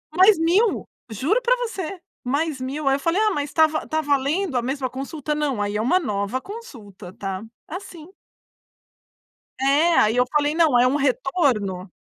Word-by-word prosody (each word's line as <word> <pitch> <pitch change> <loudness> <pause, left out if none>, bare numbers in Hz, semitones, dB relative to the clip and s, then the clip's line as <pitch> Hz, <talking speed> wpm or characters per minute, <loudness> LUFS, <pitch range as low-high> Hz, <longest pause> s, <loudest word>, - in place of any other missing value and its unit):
"Mais 380 0 +6
mil", 375 +7 +2 0.2
juro 310 - 0
pra - - +3
você, 390 -7 -4 0.2
mais 280 +2 -1
mil, 275 +3 -4
aí 270 - +4
eu - - -3
falei: 340 +8 +1
"Ah, 430 -1 +3
mas 290 -4 -2
está 315 +1 +4
va 310 0 -3
está 315 0 -1
valendo 290 +3 0
a - - +1
mesma 260 +1 -2
consulta", 285 +3 -4
não, 280 -8 -1
aí 205 0 -2
é 215 - 0
uma 350 +11 +3
nova 210 - -2
consulta, 220 - -10
tá, 195 0 -5 0.2
assim. 345 -1 -9 1.5
É, 295 +5 +3
aí 215 +3 +3
eu 250 - +4
falei, 295 0 +2
não, 315 -7 +4
é 250 - +5
um 260 - +1
retorno? 240 - 0
285 Hz, 175 wpm, -23 LUFS, 250-335 Hz, 1.5 s, Mais